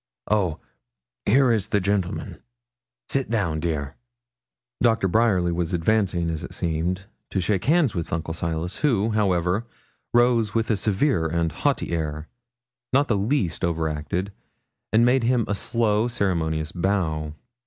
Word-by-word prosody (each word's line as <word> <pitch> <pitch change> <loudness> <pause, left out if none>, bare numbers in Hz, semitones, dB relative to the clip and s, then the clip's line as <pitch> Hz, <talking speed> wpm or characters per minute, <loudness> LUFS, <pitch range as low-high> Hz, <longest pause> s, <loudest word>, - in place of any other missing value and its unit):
Oh, 95 -7 +1 0.7
here 130 +3 +5
is 110 -5 +1
the 105 - +1
gentleman. 95 -2 -2 0.7
Sit 135 -1 -1
down, 95 -9 0
dear.' 75 -4 -3 0.8
Doctor 115 -5 +3
Bryerly 95 -4 +2
was 85 +1 -2
advancing, 90 -1 +1
as 80 -2 -4
it - - -8
seemed, 85 +3 -1 0.2
to 95 - -1
shake 95 +1 0
hands 155 - +3
with 85 -2 -4
Uncle 80 0 -2
Silas, 85 +2 -3
who, 115 -7 +1
however, 100 0 +1 0.4
rose 120 -3 +3
with 115 0 +1
a - - +3
severe 105 - +1
and 85 0 0
haughty 140 - -1
air, 80 -2 -3 0.6
not 140 +2 +3
the 110 - +3
least 100 - 0
over 80 -2 0
acted, 80 +6 -3 0.6
and 110 +3 +5
made 125 +2 +4
him 120 -2 +2
a - - 0
slow, 110 +1 +1
ceremonious 80 -8 -1
bow. 85 -5 -1
95 Hz, 145 wpm, -24 LUFS, 85-115 Hz, 0.8 s, here